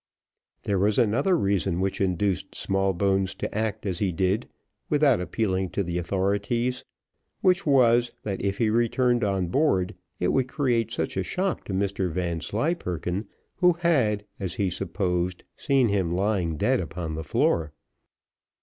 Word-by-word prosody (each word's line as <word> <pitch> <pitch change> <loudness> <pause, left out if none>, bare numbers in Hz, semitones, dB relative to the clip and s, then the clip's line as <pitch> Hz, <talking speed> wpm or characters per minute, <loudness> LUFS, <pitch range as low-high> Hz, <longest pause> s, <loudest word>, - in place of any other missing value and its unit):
There 100 -2 0
was 105 +2 +2
another 130 - +3
reason 95 - 0
which 95 +1 -1
induced 95 0 0
Smallbones 95 0 0
to - - -5
act 110 0 -2
as 95 -3 -2
he 100 -3 +1
did 95 +6 0 0.4
without 145 -8 +3
appealing 95 -1 -1
to 100 - +2
the 90 0 -2
authorities 100 +7 -1 0.6
which 185 -1 +2
was, 120 -3 +4
that 100 -3 -3
if 100 0 -1
he 110 -3 +2
returned 120 +1 +2
on 95 -4 0
board, 95 - +1 0.3
it 90 - +1
would 130 -1 +1
create 125 -5 0
such - - -3
a - - +1
shock 190 0 -2
to 100 - -5
Mr 95 -1 0
Vanslyperken, 90 - -2 0.3
who 180 -1 +5
had, 130 - +1
as 95 -3 -3
he 95 -3 0
supposed, 90 -1 -2
seen 135 -4 +2
him 95 -4 0
lying 95 -5 0
dead - - +2
upon 85 -2 -4
the 80 +1 -4
floor. 80 0 +1
100 Hz, 150 wpm, -26 LUFS, 90-120 Hz, 0.6 s, who